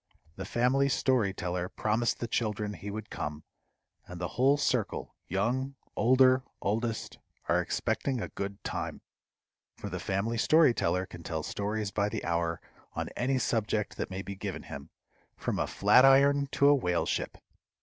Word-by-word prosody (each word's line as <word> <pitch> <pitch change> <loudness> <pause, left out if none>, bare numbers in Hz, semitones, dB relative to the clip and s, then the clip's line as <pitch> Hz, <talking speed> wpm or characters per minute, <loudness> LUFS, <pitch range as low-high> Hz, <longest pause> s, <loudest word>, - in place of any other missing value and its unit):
The 95 - -6
Family 125 +6 +2
Story 125 -6 +2
Teller 90 -1 -3
promised 110 +3 0
the 120 - -3
children 105 -3 -1
he 105 - -7
would 110 +1 -6
come, 75 0 -4 0.6
and 90 -1 -8
the 85 - -2
whole 135 +3 +3
circle, 125 -6 -1
young, 125 +9 -1 0.2
older, 130 +1 +5 0.2
oldest, 115 +2 -2 0.3
are - - +3
expecting 135 -3 -1
a - - -4
good 100 0 -6
time; - - -4 0.8
for - - -6
the - - -3
Family 110 +4 -1
Story 155 0 +5
Teller 90 -2 0
can 85 -2 -11
tell 80 -1 -4
stories 105 +3 -2
by 100 +1 0
the - - -4
hour 85 -1 0 0.3
on - - -3
any 130 +2 0
subject 110 -4 -1
that - - -3
may 95 +1 -5
be 100 - -6
given 95 - -5
him, 70 0 -9 0.5
from - - -2
a - - 0
flat 130 - +5
iron 140 +1 +5
to 140 - +4
a - - +7
whale 90 -11 +1
ship. - - -2
110 Hz, 165 wpm, -30 LUFS, 95-130 Hz, 0.8 s, a